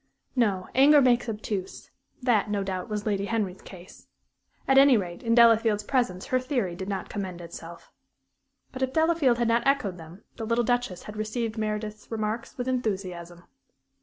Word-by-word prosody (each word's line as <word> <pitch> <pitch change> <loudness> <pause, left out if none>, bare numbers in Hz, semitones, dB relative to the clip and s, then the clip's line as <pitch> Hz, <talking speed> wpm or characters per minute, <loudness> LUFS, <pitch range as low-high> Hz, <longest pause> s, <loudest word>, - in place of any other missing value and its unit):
No, 200 -7 +1
anger 285 +3 +7
makes 245 -3 +3
obtuse; 210 -3 -5 0.3
that, 225 -5 +2
no 205 -1 -1
doubt, 185 0 -4
was 210 -1 -3
Lady 200 -2 0
Henry's 200 -4 -2
case. 185 -1 -13 0.6
At 270 0 +6
any 275 -3 +7
rate, 175 -4 -5
in 230 -1 +1
Delafield's 225 -3 +5
presence 205 -7 -1
her 255 - +1
theory 250 - -2
did 190 +2 -6
not 195 -2 -3
commend 190 -4 -5
itself. 170 0 -10 0.8
But 260 - -8
if 260 0 -1
Delafield 320 -6 +3
had 240 -1 +1
not 230 +1 +3
echoed 205 -10 +1
them, 165 +5 -12
the 225 - -4
little 235 +1 +2
Duchess 245 -6 -1
had 210 0 -9
received 220 +1 -3
Meredith's 215 -1 -4
remarks 220 +1 -4
with 250 0 -3
enthusiasm. 185 -8 -3
215 Hz, 165 wpm, -26 LUFS, 190-245 Hz, 0.8 s, anger